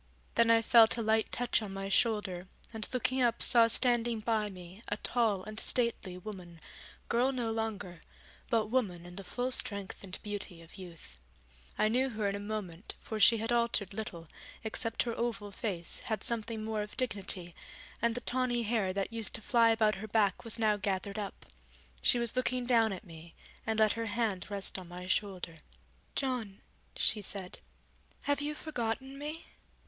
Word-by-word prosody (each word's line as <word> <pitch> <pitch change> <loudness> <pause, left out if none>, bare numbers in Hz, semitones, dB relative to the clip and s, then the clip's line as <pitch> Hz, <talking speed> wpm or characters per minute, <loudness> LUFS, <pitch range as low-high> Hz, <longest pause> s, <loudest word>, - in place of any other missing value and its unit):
Then 230 0 +4
I 230 0 +6
felt 225 0 +7
a - - 0
light 220 0 +2
touch 245 -1 +1
on 200 -3 -5
my 195 0 -3
shoulder, 195 -4 +1 0.3
and 220 -1 -4
looking 255 +1 +1
up 235 -2 +3
saw 235 -2 +6
standing 235 -1 +2
by 215 -1 0
me 185 +1 -11
a 205 - -1
tall 220 -5 +1
and 215 +2 -7
stately 235 -7 0
woman, 180 -3 -9 0.5
girl 250 +3 +3
no 240 -4 -1
longer, 205 -6 -3 0.5
but 225 -2 +3
woman 190 -9 0
in 175 0 -10
the 195 - -5
full 245 +8 -2
strength 200 -6 0
and 185 -1 -6
beauty 205 -4 -5
of 165 - -15
youth. 165 - -11 0.6
I 215 - +4
knew 255 +4 +2
her 215 -3 -1
in 200 - 0
a - - -3
moment, 205 -4 -5
for 220 - -5
she 230 +3 +7
had 225 +2 -2
altered 235 -5 +1
little, 175 -6 -5 0.4
except 225 +1 -1
her 235 - -2
oval 220 -4 -2
face 190 -4 -1
had 220 -2 -3
something 225 -1 0
more 220 -1 -1
of 210 - -7
dignity, 195 -7 -2 0.5
and 230 0 +2
the 245 - -2
tawny 245 -1 0
hair 215 -4 +1
that 195 +3 -2
used 225 -2 0
to - - -5
fly 230 +1 +5
about 220 -2 +4
her 215 - -5
back 205 -3 +2
was 230 0 +2
now 215 -2 +3
gathered 200 +1 -2
up. 200 -2 -6 0.6
She - - +5
was 235 -1 0
looking 255 -1 +1
down 230 -3 +4
at 190 - -5
me, 165 -1 -12 0.3
and 220 -1 +1
let 215 -1 +5
her 230 0 -3
hand 205 -4 -1
rest 200 -1 0
on 180 - -9
my 180 +1 -7
shoulder. 185 -3 -1 0.6
'John,' 245 -7 -2 0.3
she 215 - +3
said, 190 -2 -3 0.6
'have 285 0 +1
you 300 +1 -2
forgotten 265 -2 -3
me? 305 +3 -5
220 Hz, 180 wpm, -32 LUFS, 195-235 Hz, 0.6 s, felt